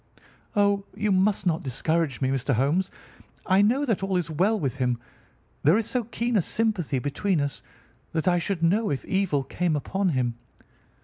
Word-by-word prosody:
"Oh, 200 -1 +3
you 210 0 0
must 190 0 +2
not 165 -2 +1
discourage 150 +2 -1
me, 130 - +1
Mr. 135 0 0
Holmes. 150 - +1 0.6
I 190 +1 +4
know 250 +8 +3
that 225 -8 0
all 195 -1 0
is 170 -2 -2
well 195 +8 +2
with 135 -5 -2
him. 125 -2 0 0.6
There 160 +8 +5
is 225 - 0
so 245 0 -1
keen 235 +1 -2
a 200 - +5
sympathy 200 -8 -1
between 150 +7 0
us 145 -1 -2 0.5
that 160 +2 -2
I 175 -1 +4
should 170 0 -2
know 205 +6 +2
if 140 -3 -3
evil 190 -8 0
came 170 +3 -1
upon 190 +6 -1
him. 125 -5 -1
180 Hz, 180 wpm, -26 LUFS, 145-200 Hz, 0.6 s, There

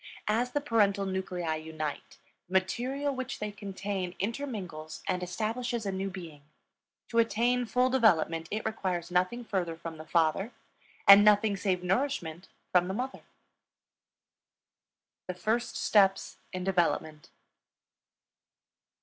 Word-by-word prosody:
As 240 +4 +1
the 290 - +1
parental 205 -7 +2
nuclei 180 -4 -2
unite, 155 -1 -6 0.3
the 180 - -12
material 255 +10 0
which 260 0 -4
they 210 0 -4
contain 195 -2 -4
intermingles 195 - -5
and 180 - 0
establishes 225 +5 -2
a 195 - -1
new 190 +1 -2
being; 170 -6 -9 0.7
to 230 - +2
attain 240 +2 +2
full 250 +2 +2
development, 165 -10 +3
it 215 +1 -3
requires 185 -6 -2
nothing 185 +7 0
further 180 -6 -2
from 165 -1 -7
the 155 - -9
father, 170 +7 +1 0.5
and 200 +1 +11
nothing 210 0 +5
save 185 -2 -1
nourishment 180 - -1 0.2
from 180 -1 +4
the 190 - -3
mother. 260 +4 -4 2.1
THE 185 - -4
FIRST 220 +7 -1
STEPS 195 -2 +3
IN 185 -1 -4
DEVELOPMENT. 170 -4 0
195 Hz, 125 wpm, -30 LUFS, 175-230 Hz, 2.1 s, and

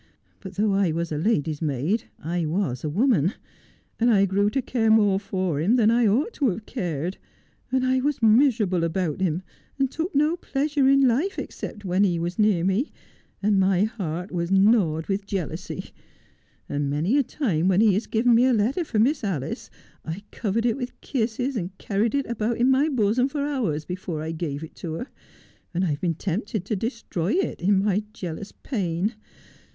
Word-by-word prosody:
But 190 -2 -9
though 205 +1 +2
I 195 -3 +2
was 165 +1 -2
a 150 - -1
ladys 160 -6 0
maid 155 - 0
I 170 +1 -2
was 160 -7 -1
a 155 - -1
woman, 195 - +2 0.7
and 235 +1 +4
I 200 -4 +5
grew 200 +2 +2
to 270 - -1
care 235 -3 0
more 205 -3 +4
for 185 -6 -2
him 195 +10 +3
than 225 -3 +4
I 235 -1 +4
ought 265 - +1
to 275 -4 +1
have 210 +3 -4
cared, 175 - -3 0.5
and 260 0 +2
I 260 0 +2
was 290 +1 0
miserable 220 -6 +4
about 165 0 -1
him, 180 -1 0 0.3
and 270 -1 +1
took 325 0 -3
no 300 +4 +3
pleasure 285 -3 0
in 275 -1 +5
life 285 +12 +1
except 210 -1 -6
when 185 +2 +2
he 180 -4 +2
was 175 +3 -3
near 210 -5 +3
me, 195 - +1 0.5
and 205 -1 +3
my 190 0 +3
heart 180 -4 -3
was 170 -1 -2
gnawed 190 -5 +3
with 200 0 -2
jealousy; 180 -3 -4 0.8
and 145 0 -1
many 155 - +1
a - - +3
time 200 - -1
when 190 0 +3
he 215 -2 +5
has 205 +5 -1
given 235 +2 +3
me 235 +2 +5
a 260 - +4
letter 235 - +1
for 250 -8 -3
Miss 260 +5 +2
Alice 160 -8 -3 0.3
I 160 - -4
have 200 +4 -11
covered 225 +1 -1
it 235 0 +1
with 250 -2 -6
kisses, 250 +1 -1
and 190 -2 -4
carried 210 +5 0
it 280 - +1
about 230 0 -1
in 250 +2 +3
my 275 +4 +3
bosom 245 -1 +2
for 280 0 -2
hours 220 - -1
before 180 -3 -4
I 160 - -3
gave 155 -3 -4
it 160 - -9
to 165 -3 -5
her, 245 +11 -5 0.7
and 180 +2 +1
I've 150 -2 -2
been 170 -3 0
tempted 195 +3 -3
to 215 - -1
destroy 215 -4 -2
it 385 - -1
in 195 +2 +3
my 205 0 +2
jealous 185 -1 -6
pain. 195 - -2
200 Hz, 195 wpm, -25 LUFS, 175-240 Hz, 0.8 s, I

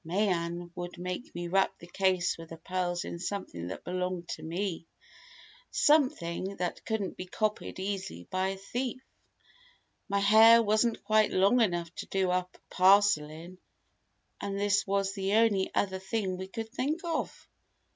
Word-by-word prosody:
"Mayen 175 -1 -1
would 175 0 -6
make 180 +6 -5
me 175 0 -4
wrap 195 +2 +1
the - - -12
case 185 0 +1
with 165 -1 -11
the 165 - -8
pearls 175 +1 -2
in 170 - -6
something 180 - -4
that 95 - -7
belonged 180 -1 -3
to - - -5
me 170 0 -3 0.8
something 200 - +2
that 180 -2 -3
couldn't 220 -4 -2
be 185 - -6
copied 215 +3 -2
easily 190 - -4
by 185 0 0
a 195 0 -3
thief. 245 +6 -4 1.1
My 200 - +1
hair 220 +3 +7
wasn't 220 +2 +1
quite 215 -1 +3
long 200 +6 +4
enough 175 -5 0
to - - -5
do 190 -2 0
up 180 0 -1
a - - -21
parcel 190 -4 +5
in, 170 +4 -11 0.8
and 200 0 -3
this 205 0 +2
was 195 0 0
the 195 0 -1
only 215 -4 +3
other 190 -1 0
thing 190 -1 -2
we 190 +1 -6
could 225 +3 -6
think 295 +9 -2
of!" 335 -2 -3
190 Hz, 160 wpm, -30 LUFS, 175-205 Hz, 1.1 s, hair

